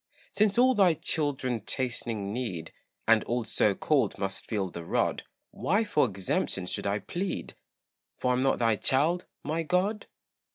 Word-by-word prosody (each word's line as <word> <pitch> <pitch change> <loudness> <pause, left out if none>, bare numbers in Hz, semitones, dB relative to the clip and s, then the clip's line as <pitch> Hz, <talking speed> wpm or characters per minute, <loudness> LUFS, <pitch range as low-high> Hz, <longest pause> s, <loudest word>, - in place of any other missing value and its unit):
Since 210 0 +2
all 255 +1 +6
thy 190 -7 +4
children 145 -7 -1
chastening 115 -5 -2
need, 100 -10 -4 0.3
And 115 -1 +5
all 120 0 -1
so 105 -2 +2
called 145 +4 +1
must 95 -1 -4
feel 100 -4 -2
the 85 - -7
rod, - - 0 0.3
Why 205 +5 +1
for 205 -10 +2
exemption 95 -1 -1
should 90 - -3
I 100 +1 +1
plead, 175 - -4 0.6
For 125 - +1
am 125 - +1
I - - +1
not 135 0 +2
thy 115 -2 +2
child, 155 - +2 0.2
my 155 +3 -1
God? 185 +6 0
130 Hz, 160 wpm, -28 LUFS, 105-175 Hz, 0.6 s, all